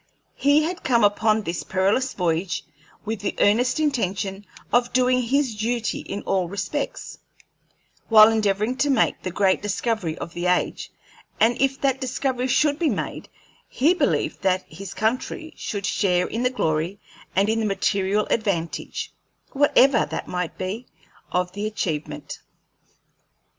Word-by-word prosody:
He 285 Hz, +2 st, +3 dB
had 345 Hz, +3 st, -4 dB
come 235 Hz, -3 st, +3 dB
upon 215 Hz, +1 st, +3 dB
this 170 Hz, -2 st, -3 dB
perilous 200 Hz, +8 st, 0 dB
voyage 175 Hz, 0 st, -1 dB, 0.4 s
with 220 Hz, -1 st, -3 dB
the 205 Hz, -, -2 dB
earnest 245 Hz, +8 st, +3 dB
intention 200 Hz, -, -1 dB, 0.3 s
of 245 Hz, 0 st, +3 dB
doing 255 Hz, 0 st, +3 dB
his 260 Hz, +1 st, +1 dB
duty 225 Hz, +1 st, -1 dB
in 200 Hz, -, -6 dB
all 185 Hz, -3 st, 0 dB
respects, 200 Hz, -, -4 dB, 0.9 s
while 215 Hz, 0 st, +8 dB
endeavoring 215 Hz, +2 st, 0 dB
to 290 Hz, -, +1 dB
make 260 Hz, -5 st, +2 dB
the -, -, -3 dB
great 190 Hz, +1 st, +2 dB
discovery 205 Hz, -4 st, -2 dB
of 170 Hz, -, -7 dB
the 175 Hz, +1 st, -2 dB
age; 180 Hz, 0 st, 0 dB, 0.5 s
and 230 Hz, +2 st, +4 dB
if 270 Hz, 0 st, +1 dB
that 270 Hz, -1 st, +1 dB
discovery 260 Hz, -1 st, -1 dB
should 290 Hz, +3 st, +2 dB
be 330 Hz, -3 st, +2 dB
made, -, -, -4 dB, 0.4 s
he 305 Hz, +7 st, +3 dB
believed 365 Hz, -, 0 dB
that 185 Hz, -1 st, +1 dB
his 195 Hz, 0 st, -9 dB
country 255 Hz, -, -2 dB
should 200 Hz, -2 st, -4 dB
share 180 Hz, -3 st, +1 dB
in 230 Hz, -, -3 dB
the 250 Hz, -, +2 dB
glory 170 Hz, -5 st, -1 dB, 0.4 s
and 195 Hz, +2 st, +3 dB
in 220 Hz, +1 st, +1 dB
the 220 Hz, -, 0 dB
material 200 Hz, +1 st, +1 dB
advantage, 190 Hz, -7 st, -2 dB, 0.4 s
whatever 275 Hz, -3 st, +4 dB
that -, -, -5 dB
might 180 Hz, -2 st, -3 dB
be, 205 Hz, +7 st, -4 dB, 0.4 s
of 180 Hz, 0 st, 0 dB
the 205 Hz, +3 st, -3 dB
achievement. 165 Hz, -8 st, -4 dB
215 Hz, 145 wpm, -23 LUFS, 190-255 Hz, 0.9 s, while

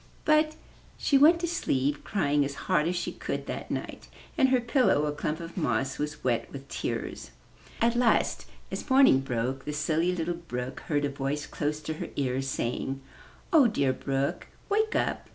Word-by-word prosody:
But 310 Hz, 0 st, +4 dB, 0.4 s
she 275 Hz, -, +3 dB
went 325 Hz, +4 st, +7 dB
to 345 Hz, -, 0 dB
sleep, 145 Hz, -, 0 dB
crying 145 Hz, -7 st, +1 dB
as 140 Hz, 0 st, -3 dB
hard 150 Hz, +1 st, +2 dB
as 180 Hz, -, 0 dB
she 175 Hz, -, -2 dB
could -, -, -4 dB
that -, -, -5 dB
night -, -, -5 dB, 0.3 s
and 265 Hz, -, +4 dB
her 255 Hz, -1 st, +4 dB
pillow, 235 Hz, -, +2 dB
a 150 Hz, -, 0 dB
clump 150 Hz, +2 st, -3 dB
of 165 Hz, 0 st, -8 dB
moss, 135 Hz, -6 st, -1 dB
was 150 Hz, 0 st, -4 dB
wet 120 Hz, -2 st, 0 dB
with 135 Hz, 0 st, -9 dB
tears. -, -, -4 dB, 0.5 s
At 235 Hz, +1 st, +2 dB
last, 240 Hz, -2 st, +2 dB, 0.2 s
as -, -, -5 dB
morning 260 Hz, -, +6 dB
broke, 130 Hz, +1 st, -2 dB
the 150 Hz, -, -3 dB
Silly 155 Hz, +3 st, +1 dB
Little 170 Hz, 0 st, -1 dB
Brook 130 Hz, -7 st, -5 dB
heard 145 Hz, -2 st, +1 dB
a -, -, 0 dB
voice 140 Hz, +1 st, -3 dB
close 150 Hz, 0 st, -2 dB
to 160 Hz, +1 st, -3 dB
her -, -, -3 dB
ear, 130 Hz, -2 st, 0 dB
saying, 135 Hz, 0 st, -2 dB, 0.5 s
0h, 265 Hz, -9 st, +6 dB
dear 135 Hz, -6 st, +2 dB
Brook, 135 Hz, +1 st, -2 dB, 0.2 s
wake 435 Hz, +2 st, +2 dB
up! -, -, -1 dB
150 Hz, 180 wpm, -28 LUFS, -, 0.5 s, went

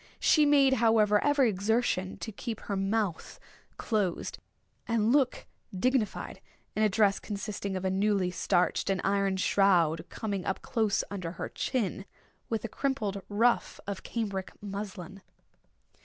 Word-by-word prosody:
She 305 Hz, -2 st, +4 dB
made, 280 Hz, -2 st, +5 dB
however, 215 Hz, -2 st, +4 dB
every 290 Hz, -3 st, +4 dB
exertion 200 Hz, -2 st, 0 dB
to 220 Hz, -, -4 dB
keep 225 Hz, +1 st, -6 dB
her 200 Hz, -, -3 dB
mouth 195 Hz, -2 st, -2 dB, 0.4 s
closed 205 Hz, -6 st, -1 dB, 0.5 s
and 230 Hz, -1 st, +2 dB
look 270 Hz, -2 st, +2 dB, 0.3 s
dignified, 245 Hz, -1 st, -1 dB, 0.3 s
in 215 Hz, -, 0 dB
a 215 Hz, -, +4 dB
dress 200 Hz, 0 st, +3 dB
consisting 200 Hz, -1 st, -4 dB
of 185 Hz, 0 st, -3 dB
a 190 Hz, -, +1 dB
newly 195 Hz, -1 st, +1 dB
starched 180 Hz, +1 st, +1 dB
and 195 Hz, -1 st, +1 dB
ironed 195 Hz, -1 st, +1 dB
shroud 175 Hz, -5 st, +3 dB
coming 200 Hz, -4 st, -3 dB
up 190 Hz, -, -3 dB
close 220 Hz, -3 st, +1 dB
under 180 Hz, -4 st, -4 dB
her -, -, -5 dB
chin, 205 Hz, -6 st, -2 dB, 0.4 s
with 225 Hz, -1 st, -2 dB
a -, -, -1 dB
crimpled 215 Hz, -6 st, -2 dB
ruffle 230 Hz, +4 st, +1 dB
of 200 Hz, -1 st, -4 dB
cambric 200 Hz, -5 st, -3 dB
muslin. 195 Hz, -2 st, -7 dB
205 Hz, 140 wpm, -29 LUFS, 190-225 Hz, 0.5 s, made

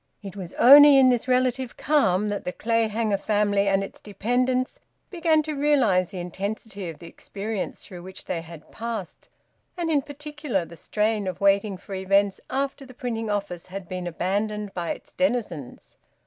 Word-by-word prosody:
It 195 Hz, -1 st, -8 dB
was 185 Hz, -4 st, -7 dB
only 285 Hz, +2 st, +9 dB
in 260 Hz, -1 st, +7 dB
this 245 Hz, 0 st, +1 dB
relative 255 Hz, 0 st, +1 dB
calm 210 Hz, -9 st, +2 dB
that 205 Hz, -, -3 dB
the 180 Hz, -, -3 dB
Clayhanger 225 Hz, -1 st, 0 dB
family 205 Hz, -1 st, +1 dB
and 195 Hz, 0 st, +2 dB
its 195 Hz, -, -9 dB
dependants 250 Hz, +5 st, -1 dB, 0.3 s
began 325 Hz, -4 st, +2 dB
to 310 Hz, 0 st, -4 dB
realise 265 Hz, -, +2 dB
the 190 Hz, -, -8 dB
intensity 195 Hz, +2 st, -5 dB
of 160 Hz, -, -8 dB
the 170 Hz, -, -12 dB
experience 200 Hz, +4 st, -5 dB
through 180 Hz, -2 st, -10 dB
which 185 Hz, +1 st, -10 dB
they 170 Hz, -2 st, -3 dB
had 165 Hz, -2 st, -13 dB
passed, 225 Hz, -5 st, -6 dB, 0.5 s
and, 335 Hz, -2 st, -1 dB
in 290 Hz, -2 st, +3 dB
particular, 290 Hz, -, -4 dB
the 170 Hz, -, -12 dB
strain 210 Hz, +2 st, -1 dB
of 185 Hz, -, -4 dB
waiting 200 Hz, 0 st, +2 dB
for 195 Hz, -, -10 dB
events 195 Hz, +1 st, +1 dB
after 275 Hz, +1 st, -2 dB
the 255 Hz, -2 st, -13 dB
printing 225 Hz, -3 st, -3 dB
office 200 Hz, -4 st, -3 dB
had 190 Hz, 0 st, -7 dB
been 180 Hz, 0 st, -4 dB
abandoned 205 Hz, +4 st, -2 dB
by 175 Hz, -2 st, -3 dB
its -, -, -6 dB
denizens. 225 Hz, -, -3 dB
210 Hz, 170 wpm, -25 LUFS, 190-255 Hz, 0.5 s, only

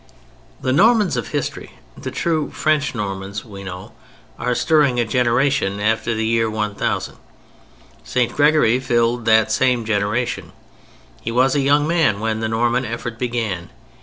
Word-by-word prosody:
The 130 Hz, -, -1 dB
Normans 210 Hz, -, +4 dB
of 120 Hz, -, -3 dB
history, -, -, -4 dB, 0.2 s
the 130 Hz, -, -6 dB
true 155 Hz, +3 st, -1 dB
French 150 Hz, -4 st, 0 dB
Normans 100 Hz, -1 st, -4 dB
we 100 Hz, -3 st, -10 dB
know, 90 Hz, -1 st, -8 dB, 0.5 s
are 125 Hz, 0 st, 0 dB
stirring 145 Hz, -6 st, +2 dB
a 120 Hz, -, +2 dB
generation 120 Hz, -3 st, +1 dB
after 110 Hz, +2 st, 0 dB
the 110 Hz, 0 st, -1 dB
year 115 Hz, 0 st, +1 dB
1000. 105 Hz, -1 st, -2 dB, 0.9 s
St. 120 Hz, -, -1 dB
Gregory 145 Hz, -5 st, +4 dB
filled 120 Hz, -2 st, 0 dB
that 110 Hz, -1 st, +4 dB
same 125 Hz, 0 st, +2 dB
generation. 105 Hz, +3 st, -1 dB, 0.7 s
He 115 Hz, -, -4 dB
was 130 Hz, +3 st, +3 dB
a 145 Hz, -, +2 dB
young 145 Hz, +2 st, +3 dB
man 160 Hz, -12 st, +2 dB
when 110 Hz, 0 st, -1 dB
the 110 Hz, 0 st, -2 dB
Norman 120 Hz, +3 st, +1 dB
effort 115 Hz, -1 st, -5 dB
began. 115 Hz, -8 st, -2 dB
120 Hz, 145 wpm, -20 LUFS, 110-130 Hz, 0.9 s, Normans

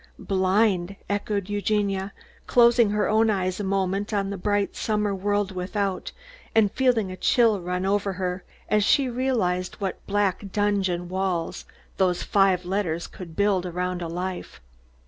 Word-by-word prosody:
"Blind!" 190 Hz, -1 st, +1 dB, 0.2 s
echoed 205 Hz, -1 st, -1 dB
Eugenia, 205 Hz, -1 st, -1 dB, 0.4 s
closing 235 Hz, -2 st, +5 dB
her 210 Hz, 0 st, +1 dB
own 220 Hz, +1 st, +3 dB
eyes 185 Hz, -2 st, -1 dB
a -, -, -2 dB
moment 195 Hz, +1 st, -1 dB
on 200 Hz, -2 st, -1 dB
the -, -, -3 dB
bright 205 Hz, +2 st, 0 dB
summer 210 Hz, -2 st, 0 dB
world 205 Hz, +1 st, 0 dB
without, 190 Hz, +1 st, -3 dB, 0.4 s
and 215 Hz, -3 st, +4 dB
feeling 240 Hz, -7 st, +1 dB
a -, -, -5 dB
chill 225 Hz, +1 st, +3 dB
run 180 Hz, +1 st, -2 dB
over 200 Hz, 0 st, 0 dB
her, 180 Hz, 0 st, -3 dB, 0.2 s
as 210 Hz, -1 st, +2 dB
she 270 Hz, +5 st, +3 dB
realised 230 Hz, -8 st, -1 dB
what 195 Hz, -2 st, -4 dB
black 200 Hz, -1 st, 0 dB
dungeon 195 Hz, -4 st, 0 dB
walls 185 Hz, -2 st, -2 dB, 0.3 s
those 180 Hz, -2 st, +1 dB
five 195 Hz, -3 st, +2 dB
letters 180 Hz, -3 st, -1 dB
could 170 Hz, -4 st, -10 dB
build 200 Hz, -3 st, +2 dB
around 180 Hz, 0 st, -3 dB
a 170 Hz, -, -3 dB
life. 180 Hz, -, -5 dB
195 Hz, 145 wpm, -25 LUFS, 185-205 Hz, 0.4 s, closing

